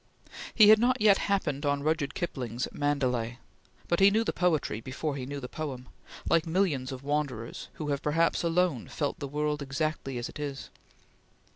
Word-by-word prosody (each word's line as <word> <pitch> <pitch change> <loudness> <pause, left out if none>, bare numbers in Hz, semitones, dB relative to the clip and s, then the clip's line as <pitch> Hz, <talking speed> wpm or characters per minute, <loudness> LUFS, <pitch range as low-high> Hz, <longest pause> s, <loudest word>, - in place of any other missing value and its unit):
He 215 -3 +8
had 215 0 +8
not 255 +2 +2
yet 210 -2 +5
happened 160 -8 0
on 145 -1 0
Rudyard 155 -2 0
Kipling's 125 -7 -3
"Mandalay," 125 -5 -1 0.5
but 170 - +1
he 195 +1 +8
knew 220 +3 +2
the - - -2
poetry 160 -11 0
before 140 +4 -3
he 130 -2 -5
knew 140 +1 -5
the 125 - -6
poem, 130 -4 -6 0.4
like 165 -1 +3
millions 160 -7 0
of 130 0 -7
wanderers, 140 -5 -3
who 150 -2 -5
have 140 -1 -1
perhaps 165 +3 +2
alone 170 -6 +1
felt 145 -2 -3
the 140 - -4
world 150 +1 -1
exactly 140 -1 -2
as 120 - -3
it - - -10
is. 140 -2 -5
145 Hz, 175 wpm, -29 LUFS, 135-165 Hz, 0.5 s, He